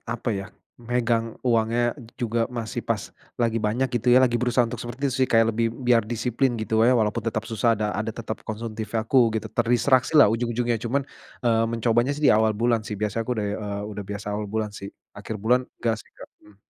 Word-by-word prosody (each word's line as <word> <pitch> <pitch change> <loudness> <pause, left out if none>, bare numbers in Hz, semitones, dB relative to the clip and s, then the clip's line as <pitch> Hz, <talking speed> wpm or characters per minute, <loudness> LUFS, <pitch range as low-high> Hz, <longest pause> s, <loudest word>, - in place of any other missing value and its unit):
apa 120 +1 -3
ya, 95 0 -4 0.3
megang 115 -1 -1
uangnya 120 0 +2 0.2
juga 115 0 -1
masih 120 0 -4
pas 110 -3 -2 0.3
lagi 115 -1 +1
banyak 115 +5 +1
gitu 120 +1 +1
ya, 130 - +8
lagi 120 -2 +3
berusaha 125 0 +2
untuk 115 0 -6
seperti 120 +3 -8
itu - - -3
sih, - - -6
kayak 115 0 +4
lebih 115 0 +1
biar 120 -1 +2
disiplin 120 +3 -1
gitu 110 0 +1
wae 120 - +5
walaupun 115 -2 +1
tetap 110 -1 -2
susah 115 0 +2
ada 105 - 0
ada 110 +1 -2
tetap 110 -1 -6
konsumtif 110 0 -5
ya, 110 - +1
aku 120 -3 +4
gitu, - - -3
terdistraksi 125 +4 +2
lah - - +9
ujung-ujungnya. 120 0 0
Cuman, 130 +4 0 0.4
eee, 115 -1 +3
mencobanya 115 +2 +1
sih 150 - -3
di - - +7
awal 110 0 +3
bulan 115 0 +2
sih, 105 - -4
biasa 105 +1 -1
aku 125 - -6
udah, 105 - -1 0.2
eee, 100 0 -4
udah 105 - -5
biasa 100 0 -6
awal 105 0 -3
bulan 110 0 -2
sih, 100 - -7 0.3
akhir 105 +1 -6
bulan, 120 +5 +3 0.2
nggak 115 -1 +1
sih, - - -27
Kak, - - -11
mmm. 105 -2 -20
115 Hz, 210 wpm, -24 LUFS, 110-120 Hz, 0.4 s, lah